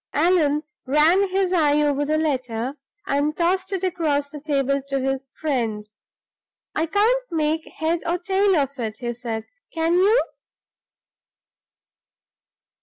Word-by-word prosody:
Allan 305 -2 +2 0.2
ran 325 +8 +4
his 375 -1 +1
eye 300 -4 +3
over 290 0 +1
the 310 +1 +1
letter, 255 -4 -2 0.3
and 290 -1 0
tossed 370 +2 +1
it 385 -1 -2
across 305 -6 0
the 295 - -8
table 275 -2 0
to 275 0 -1
his 270 0 -2
friend. 230 -8 -1 0.9
"I 320 - 0
can't 445 +8 +2
make 315 0 0
head 325 +2 -1
or 345 +1 +1
tail 385 +2 +2
of 280 -3 -1
it," 220 -2 -3
he 240 0 -3
said, 230 -2 -5 0.3
"can 330 0 0
you?" 400 +7 +4
300 Hz, 130 wpm, -23 LUFS, 275-355 Hz, 0.9 s, ran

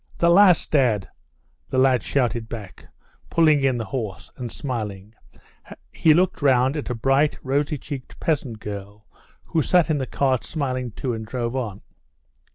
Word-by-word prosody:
"The 170 0 +4
last, 185 -1 +5
dad!" 120 -9 +2 0.6
the 130 - -2
lad 130 -2 +4
shouted 120 -4 -1
back, 105 -5 -9 0.4
pulling 155 -4 +4
in 130 -2 +2
the 115 - -3
horse, 110 -7 -5
and, 120 -3 -6
smiling, 105 -7 -5 0.8
he 155 -1 +4
looked 180 -1 +1
round 130 0 +3
at 150 - -4
a 125 - -2
bright, 135 +6 +2
rosy 145 +3 0
checked 135 -1 -8
peasant 140 -8 -1
girl 100 0 -8 0.4
who 160 - 0
sat 170 +1 +3
in 150 - +1
the 130 - -3
cart 130 -3 0
smiling 130 -5 -3
too, 120 +3 -4
and 110 -1 -5
drove 120 +1 -3
on. 110 -7 -4
130 Hz, 160 wpm, -23 LUFS, 115-145 Hz, 0.8 s, last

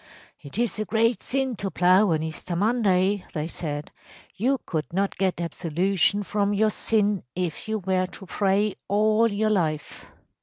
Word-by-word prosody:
‚ÄėIt 140 +6 -7
is 235 - -2
a 215 - -1
great 225 +4 +1
sin 265 -2 -1
to 195 -1 -3
plough 185 +4 +4
on 160 -2 +1
Easter 160 +2 -4
Monday,’ 200 -2 +2
they 150 -2 -2
said. 150 -3 -5 0.5
‚ÄėYou 265 +6 +2
could 155 -3 -3
not 195 +3 0
get 190 -3 0
absolution 180 +4 0
from 205 0 0
your 215 +1 +3
sin 210 -3 +1
if 180 +5 -3
you 220 - 0
were 185 -1 0
to 190 - -11
pray 200 +2 +1 0.2
all 215 +2 +3
your 215 +2 +1
life. 155 -7 -2
195 Hz, 160 wpm, -25 LUFS, 175-215 Hz, 0.5 s, plough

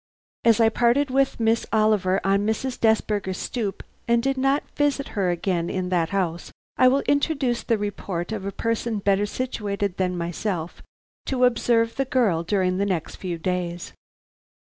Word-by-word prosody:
As 230 -1 +4
I 225 -1 +5
parted 245 +5 +2
with 270 -1 +1
Miss 225 0 +1
Oliver 210 -4 +2
on 195 +1 +2
Mrs. 245 +4 -2
Desberger's 210 -4 +1
stoop 215 -6 -3 0.2
and 235 0 +3
did 270 0 +1
not 270 +2 +1
visit 290 -1 0
her 195 -4 0
again 175 -1 -1
in 185 -1 -2
that 170 -3 +1
house, 175 -4 -2 0.2
I 255 - +5
will 270 +2 +3
introduce 280 -4 +1
the 230 - 0
report 200 -3 -4
of 215 -3 -4
a 200 - -3
person 230 +1 -2
better 200 0 +1
situated 205 -5 -3
than 180 -1 0
myself 175 0 -3 0.5
to 255 -2 +2
observe 230 -1 +2
the 270 - +1
girl 230 -11 +2
during 185 +1 0
the 200 - +2
next 175 -5 -3
few 180 -3 -4
days. 175 0 -3
210 Hz, 165 wpm, -24 LUFS, 185-240 Hz, 0.5 s, I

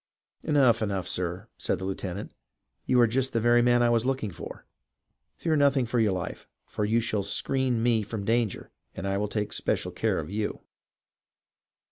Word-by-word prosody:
" - - -67
Enough, 130 -7 +4
enough, 100 -4 -1
sir," 90 +4 -3
said - - 0
the 95 - -5
lieutenant. 95 +1 -4 0.3
" - - -51
You 125 - +4
are - - +7
just 130 +3 0
the 115 - +2
very 120 +1 +4
man 120 0 +4
I 120 - +4
was 115 -1 +3
looking 130 -5 -1
for! - - -9 0.7
Fear 160 -2 0
nothing 140 -3 +3
for 120 +1 0
your 110 -3 +3
life, 90 -2 -5 0.2
for 105 - -2
you 110 +3 +2
shall 110 -2 0
screen 125 +4 0
me 115 -2 +3
from 105 -1 -5
danger, 115 -2 0 0.2
and 100 - -4
I 100 0 0
will 105 - 0
take 105 0 -2
special - - -1
care - - 0
oi - - -2
you 105 +5 -3
115 Hz, 190 wpm, -27 LUFS, 100-120 Hz, 0.7 s, are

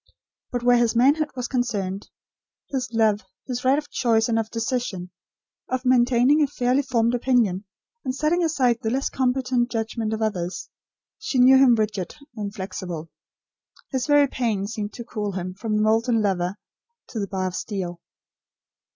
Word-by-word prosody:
But 245 -1 -2
where 245 0 +5
his 235 -1 +2
manhood 290 +6 +4
was 250 -1 -3
concerned; 205 -7 -2 0.6
his 260 -3 -2
love; 220 -2 +2 0.2
his 250 -2 -4
right 265 +2 +4
of 295 -1 -3
choice 225 -2 +2
and 225 -1 +1
of 220 -1 -3
decision; 230 -6 -3 0.6
of 255 0 -2
maintaining 250 +3 +4
a 295 - +4
fairly 255 0 +1
formed 240 -3 +1
opinion, 235 -6 +1 0.4
and 255 - -2
setting 315 +5 +1
aside 255 -7 +2
the 220 - -1
less 265 +4 -1
competent 250 -1 +1
judgment 225 -1 -2
of 220 0 -1
others; 185 -4 -3 0.5
she 430 -11 -2
knew 255 +1 +7
him 260 -3 +6
rigid, 210 -5 -2 0.2
inflexible. 190 -5 -5 0.8
His 260 0 -1
very 290 -1 +6
pain 225 -7 -1
seemed 210 -1 -5
to 235 - -7
cool 210 -4 -4
him, 185 0 -4
from 215 +3 -3
the 210 - +2
molten 225 +2 +2
lover, 185 -2 0 0.5
to 225 - -4
the 200 - -2
bar 190 -1 -2
of 185 -1 -3
steel. 180 -5 -4
235 Hz, 160 wpm, -24 LUFS, 205-255 Hz, 0.8 s, knew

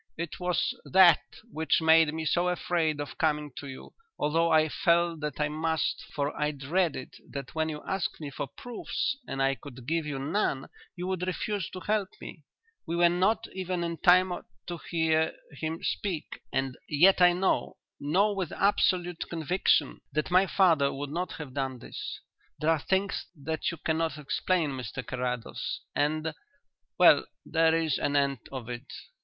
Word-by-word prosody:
"It 170 +1 -5
was 180 +8 0
that 180 -4 +6 0.3
which 160 0 +1
made 160 -1 +5
me 160 +1 -4
so 175 +3 +2
afraid 170 -4 0
of 145 - -6
coming 150 -2 +1
to 145 - -6
you, 130 -1 -10 0.2
although 165 +3 +2
I 155 0 +5
felt 170 +1 +2
that 150 -2 -4
I 150 - +2
must, 160 +1 -1
for 145 0 -1
I 150 0 0
dreaded 150 0 -1 0.2
that 140 -2 -6
when 160 0 0
you 150 -1 -6
asked 190 -3 -2
me 150 -3 -6
for 140 - -4
proofs 240 - -3
and 135 0 -1
I 135 0 +3
could 130 -3 -11
give 160 +2 -1
you 145 -2 -3
none 140 -1 -1 0.3
you 180 - -5
would 185 -1 -2
refuse 200 +1 -2
to 185 - -8
help 205 -2 0
me. 155 - -9 0.5
We 165 - -1
were 175 0 +5
not 185 +5 +2
even 185 -2 -2
in 170 -1 -3
time 180 +1 +5 0.3
to 175 -1 -5
hear 160 -1 +2 0.2
him 160 +2 -4
speak, 175 -7 -3
and 135 -1 -1
yet 180 +6 +5
I 180 0 +7
know, 185 +2 0 0.2
know 190 +9 +2
with 190 -5 -3
absolute 180 -3 +1
conviction, 165 -3 +1
that 155 +3 -1
my 185 +2 +5
father 165 -9 +4
would 140 +1 -5
not 175 +3 -2
have 150 -5 -8
done 135 -2 -2
this. - - -7 0.4
There 155 +2 +2
are 160 - +2
things 195 +4 0
that 160 +2 -2
you 170 - -5
cannot 160 +1 -1
explain, 155 +2 0
Mr 130 0 -5
Carrados, 125 -2 -3
and 155 +2 0 0.6
well, - - +6 0.2
there 165 0 +3
is 160 -4 0
an 145 - 0
end 140 -2 +2
of 130 -4 -6
it." 125 +2 -7
160 Hz, 170 wpm, -29 LUFS, 145-180 Hz, 0.6 s, I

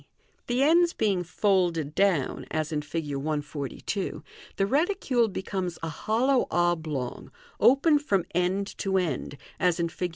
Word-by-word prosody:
The 245 +2 +2
ends 340 +3 +4
being 195 -5 +1
folded 175 -5 +1
down, 185 -8 +1
as 155 0 -2
in 150 -1 -1
Fig. 145 -1 -4
142, 145 +5 -3 0.3
the 195 - +1
reti 315 - +1
cule 240 -5 +1
becomes 190 -2 -3
a 165 - -2
hollow 240 - +1
oblong, 160 -7 -1 0.3
open 290 +4 +5
from 195 - 0
end 185 +3 0
to 190 -1 +1
end, 155 -5 -2 0.2
as 180 -2 +2
in 170 0 0
Fig. 180 +2 -3
180 Hz, 140 wpm, -27 LUFS, 155-220 Hz, 0.3 s, open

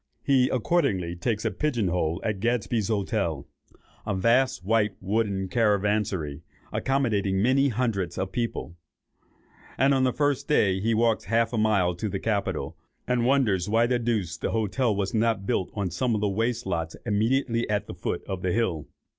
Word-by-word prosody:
He 130 -2 +3
accordingly 110 - 0
takes 105 +4 -2
a 110 - +1
pigeon 120 -4 0
hole 85 -1 0
at 105 -3 -1
Gadsby's 115 -1 0
Hotel, 100 - -1 0.6
a - - -2
vast 115 +1 +2
white 105 -1 +2
wooden 100 -1 -1
caravanserai, 105 - 0 0.3
accommodating 110 -8 0
many 130 +6 +3
hundreds 105 -8 -1
of 95 0 -2
people; 115 -7 -3 1.0
and 135 +2 +4
on 135 -1 +2
the 130 - +3
first 145 0 0
day, 95 -10 +2
walks 115 0 +2
half 115 +1 +1
a - - 0
mile 100 -5 +2
to 105 +5 -3
the 95 0 -3
Capitol, 105 -2 -2 0.3
and 125 -1 +1
wonders 110 -9 +2
why 115 +2 +3
the 120 0 +1
deuce 105 -8 -1
the - - -2
hotel 110 +1 0
was 100 -1 -2
not 110 -3 +1
built 95 - 0
on 100 -4 -2
some 115 +7 0
of 105 - -2
the 105 - +2
waste 115 +4 -1
lots 80 -1 -2
immediately 115 +2 +1
at 105 -1 0
the - - -8
foot 90 0 -4
of 95 -2 -4
the 90 - 0
hill. 90 -8 -1
110 Hz, 170 wpm, -26 LUFS, 95-120 Hz, 1.0 s, and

